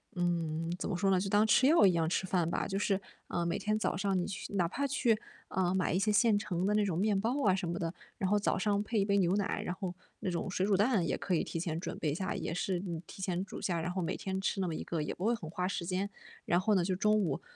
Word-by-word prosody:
嗯， 165 -2 -1
怎 - - -3
么 185 - -1
说 195 +1 +2
呢， 185 - +4
就 195 +1 -2
当 210 +2 +4
吃 255 +4 +5
药 310 -9 +6
一 185 - +6
样 165 -1 +1
吃 185 - 0
饭 175 -3 +1
吧。 - - -1
就 195 0 -2
是， 200 -2 +1 0.3
啊， 175 -1 -1
每 170 - 0
天 215 0 0
早 215 - 0
上 195 -1 +1
你 175 - -1
去 195 - -6
哪 180 -3 +2
怕 280 +10 -1
去， 240 -5 +2 0.3
呃， 185 0 +1
买 185 - +1
一 185 - +2
些 210 +2 +1
现 210 -1 +4
成 180 -2 -2
的 210 - +2
那 210 0 +3
种 175 -4 -1
面 200 0 +2
包 250 +7 0
啊 190 - +5
什 185 -2 -1
么 170 - -2
的， 165 +1 -2 0.2
然 190 - 0
后 210 0 +3
早 205 - +1
上 205 +1 +1
配 215 +1 -1
一 - - +2
杯 200 0 +2
牛 185 0 +3
奶， 200 -2 -1
然 180 - -2
后 185 -3 -4 0.3
那 185 - -2
种 175 +2 -2
水 185 +1 0
煮 200 -2 +3
蛋 210 -4 +3
也 - - 0
可 185 - -1
以 - - +1
提 165 - -4
前 165 -2 -2
准 - - -5
备 150 - 0
一 - - -2
下， 190 +1 -2
也 - - -3
是 180 0 -1
嗯， 175 -3 -5
提 190 - -11
前 185 -1 -1
煮 195 - -8
下， 170 -3 -1
然 175 +2 -2
后 185 0 -2
每 165 - -1
天 190 0 -3
吃 195 0 -1
那 185 - 0
么 165 - -2
一 - - -4
个 165 -3 -2
也 150 - -3
不 185 - -4
会 235 +1 +3
很 160 -8 -8
花 180 +2 -2
时 175 -3 -3
间。 190 +3 -1 0.4
然 175 +2 +2
后 210 +1 +3
呢， 180 - +3
就 185 -1 0
中 210 +2 +3
午 160 -9 -1
190 Hz, 325 characters per minute, -32 LUFS, 175-205 Hz, 0.4 s, 药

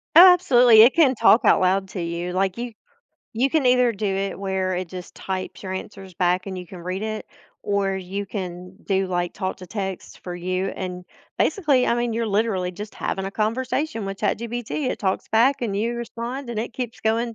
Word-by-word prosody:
Oh, 360 +2 +11
absolutely. 245 -10 +6
It 240 +4 +7
can 290 -6 +5
talk 230 0 +5
out - - +5
loud 190 +1 +2
to 185 - -5
you, 170 +1 -3
like, 190 +1 0
you 240 0 -5 0.6
you 265 +4 +2
can 300 -3 +2
either 250 -1 +4
do 215 -1 -3
it 195 0 -2
where 190 -1 -1
it 185 +1 -3
just 180 0 -9
types 185 -1 -5
your 190 - -4
answers 190 -1 -8
back 180 +1 +1
and 190 -1 -5
you 180 -1 -7
can 185 - -10
read 185 +3 -4
it, 215 0 -4 0.4
or 200 -1 0
you 190 +2 -5
can 180 -2 -6
do, 195 -1 +1
like, 175 -1 -1
talk 190 -2 -3
to 185 - -10
text 195 -1 -5
for 180 - -6
you, 185 +2 -2
and, 180 -1 -5 0.3
basically, 290 - +2
I - - +2
mean, 240 -1 -1
you're 230 0 -1
literally 200 -3 0
just 205 +4 -8
having 190 - -3
a 195 - -3
conversation 230 +3 -1
with 195 0 -5
ChatGPT, 240 +4 -2
it - - -4
talks 190 -2 -1
back, 245 +5 +3
and 205 -4 -1
you 230 +4 -1
respond, 235 +3 -5
and 230 - -4
it 230 - -5
keeps 240 -1 -5
going 230 +1 0
200 Hz, 210 wpm, -23 LUFS, 185-235 Hz, 0.6 s, Oh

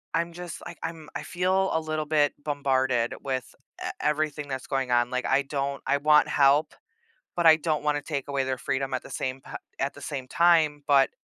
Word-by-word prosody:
I'm 170 +1 0
just, 175 0 -8
like, - - -8
I'm 160 -2 -6
I - - -4
feel 185 +2 +1
a 160 - +2
little 155 -1 -3
bit 150 -1 +2
bombarded 130 -5 0
with 130 -3 -4 0.3
e - - -2
everything 150 -1 -1
that's 130 -2 -5
going 135 -2 -1
on, 120 0 +3
like, 125 0 -2
I 135 +1 +3
don't 140 0 -3
I 140 - +3
want 150 +1 +5
help, 145 +2 +3 0.6
but 175 -1 +2
I 160 - +9
don't 155 -1 -1
wanna 150 -1 +1
take 145 -2 -4
away 140 -1 0
their 130 0 -1
freedom 135 +1 -2
at 130 - -2
the - - -12
same 130 +1 -3
pi - - -8 0.2
at 135 +1 -1
the 145 - -12
same 135 -1 -5
time, 160 -1 +3
but, 140 -2 +5
145 Hz, 210 wpm, -26 LUFS, 135-155 Hz, 0.6 s, I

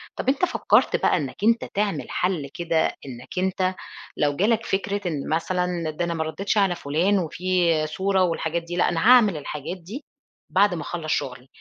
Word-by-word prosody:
طب - - -1
أنت 280 +6 +2
فكرت 350 - +2
بقى - - +2
إنّك 140 -6 -4
أنت 230 +2 +3
تعمل 205 -1 -1
حل 175 -6 -1
كده 165 -2 +1 0.2
إنّك 125 +4 -10
أنت 185 0 0 0.4
لو 145 -1 +1
جالك 220 +6 +1
فكرة 200 +1 -1
إن 150 -5 -3
مثلًا 175 0 -1
ده 165 +3 -2
أنا 170 - -2
ما 160 -1 -1
رديتش 195 +7 -2
على 195 -3 +3
فلان 175 +8 +1
وفي 180 0 +1
صورة 190 +3 +1
والحاجات 165 -1 -1
دي 170 +1 -6
لأ 175 - +2
أنا 170 - -1
هاعمل 220 -9 +6
الحاجات 150 +4 -5
دي 205 - -9 0.5
بعد 200 0 +3
ما 170 - -4
اخلّص 160 -3 -4
شغلي، 125 0 -3
175 Hz, 180 wpm, -24 LUFS, 160-195 Hz, 0.5 s, هاعمل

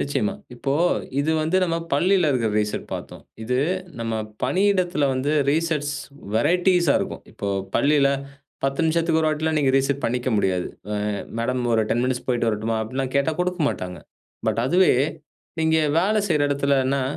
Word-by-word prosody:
நிச்சயமா. 195 +8 0 0.2
இப்போ 135 +3 -2 0.5
இது 155 - 0
வந்து 165 +4 +1
நம்ம 165 -1 -1 0.2
பள்ளியில 180 +2 +3
இருக்கற 115 -5 +1
ரீசெட் 105 0 -3
பார்த்தோம். - - -8 0.2
இது 125 +3 0 0.4
நம்ம 115 -1 -2 0.3
பணியிடத்துல 185 -5 +2
வந்து 130 +3 -1 0.2
ரீசெட்ஸ் 150 -2 0 0.4
வெரையட்டீஸ்சா 175 +4 +3
இருக்கும். - - -5
இப்போ 100 - -4 0.3
பள்ளியில, 140 -1 +4 0.6
10 135 +4 0
நிமிஷத்துக்கு 165 0 +2
ஒரு 155 - +3
வாட்டி 155 0 -2
எல்லாம் 160 -1 +1
நீங்க 135 -3 +2
ரீசெட் 135 +1 0
பண்ணிக்க 125 +2 -1
முடியாது. 95 -3 0 0.2
ஆ - - -1 0.4
மேடம் 125 +2 -1
ஒரு 110 - +3
10 120 - +1
மினிட்ஸ் 130 -1 -2
போய்ட்டு 120 -2 +1
வரட்டுமா, 110 +1 -1
அப்டி 110 +4 -7
எல்லாம் 135 -1 -2
கேட்டா 140 +3 +2
குடுக்க 180 -1 -1
மாட்டாங்க. 90 -6 -5 0.5
பட் 115 - 0
அதுவே 180 +5 +4 0.7
நீங்க 160 0 +3 0.2
வேலை 210 +5 +2
செய்யற 150 -3 +2
இடத்துலனா, 140 -1 +1
140 Hz, 155 wpm, -23 LUFS, 125-165 Hz, 0.7 s, பள்ளியில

